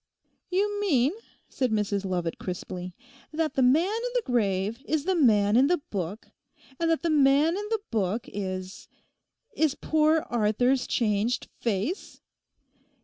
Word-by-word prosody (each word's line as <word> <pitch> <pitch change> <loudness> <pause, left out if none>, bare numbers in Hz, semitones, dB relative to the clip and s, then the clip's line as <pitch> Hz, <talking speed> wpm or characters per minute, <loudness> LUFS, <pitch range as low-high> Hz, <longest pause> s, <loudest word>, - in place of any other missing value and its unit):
'You 410 +2 0
mean,' 290 -7 +2 0.3
said 255 -2 -1
Mrs 205 -2 -1
Lovat 175 -3 -2
crisply, 180 0 -6 0.4
'that 315 0 -1
the 265 - +1
man 270 +7 +4
in 455 +5 -2
the - - +1
grave 215 -2 0
is 315 -1 0
the 380 - +2
man 215 - +4
in 260 +3 +5
the 355 +3 +3
book, 200 - -6 0.5
and 335 0 +1
that 325 0 +1
the 335 - +1
man 285 +1 +4
in 415 +1 -4
the 445 -2 -1
book 215 0 -1
is—is 185 -1 -6 0.9
poor 310 +1 +2
Arthur's 245 +3 +1
changed 220 +1 0
face? 230 - -3
245 Hz, 140 wpm, -27 LUFS, 205-320 Hz, 0.9 s, in